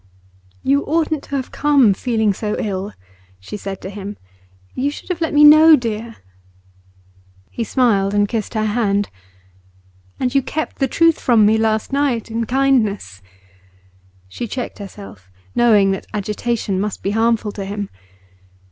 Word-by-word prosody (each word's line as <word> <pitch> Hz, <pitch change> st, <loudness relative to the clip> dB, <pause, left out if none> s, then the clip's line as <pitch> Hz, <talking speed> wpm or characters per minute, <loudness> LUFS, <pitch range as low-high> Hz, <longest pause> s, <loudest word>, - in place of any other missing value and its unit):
'You 280 Hz, +1 st, +2 dB
oughtn't 315 Hz, -1 st, 0 dB
to 280 Hz, -, -5 dB
have 265 Hz, -2 st, -3 dB
come, 280 Hz, -8 st, +3 dB
feeling 220 Hz, -1 st, 0 dB
so 210 Hz, +2 st, -3 dB
ill,' 200 Hz, 0 st, -3 dB, 0.5 s
she 95 Hz, -, -8 dB
said 195 Hz, -2 st, -6 dB
to 190 Hz, -, -6 dB
him. 205 Hz, 0 st, -7 dB, 0.6 s
'You 275 Hz, +3 st, -1 dB
should 290 Hz, -, -10 dB
have 360 Hz, -2 st, -3 dB
let 325 Hz, -, 0 dB
me 295 Hz, 0 st, +5 dB
know, 310 Hz, +2 st, +9 dB
dear.' 230 Hz, -3 st, -4 dB, 1.4 s
He 235 Hz, -, -3 dB
smiled 205 Hz, -4 st, +1 dB
and 205 Hz, 0 st, +3 dB
kissed 220 Hz, 0 st, -4 dB
her 215 Hz, 0 st, 0 dB
hand. 205 Hz, -2 st, 0 dB, 1.1 s
'And 250 Hz, -1 st, -1 dB
you 275 Hz, -, +3 dB
kept 310 Hz, +4 st, -4 dB
the 270 Hz, -, +2 dB
truth 330 Hz, +4 st, +3 dB
from 230 Hz, -4 st, +4 dB
me 220 Hz, +1 st, +3 dB
last 220 Hz, +3 st, 0 dB
night, 265 Hz, -6 st, 0 dB
in 230 Hz, 0 st, -2 dB
kindness.' 220 Hz, -, 0 dB, 1.1 s
She 230 Hz, -, -6 dB
checked 245 Hz, +1 st, -5 dB
herself, 195 Hz, -, -11 dB, 0.2 s
knowing 210 Hz, -5 st, +4 dB
that 195 Hz, -, -4 dB
agitation 210 Hz, -1 st, -2 dB
must 210 Hz, -1 st, -4 dB
be 195 Hz, -, -1 dB
harmful 225 Hz, -1 st, +1 dB
to 200 Hz, -, -6 dB
him. 200 Hz, +1 st, -4 dB
220 Hz, 150 wpm, -19 LUFS, 205-265 Hz, 1.4 s, know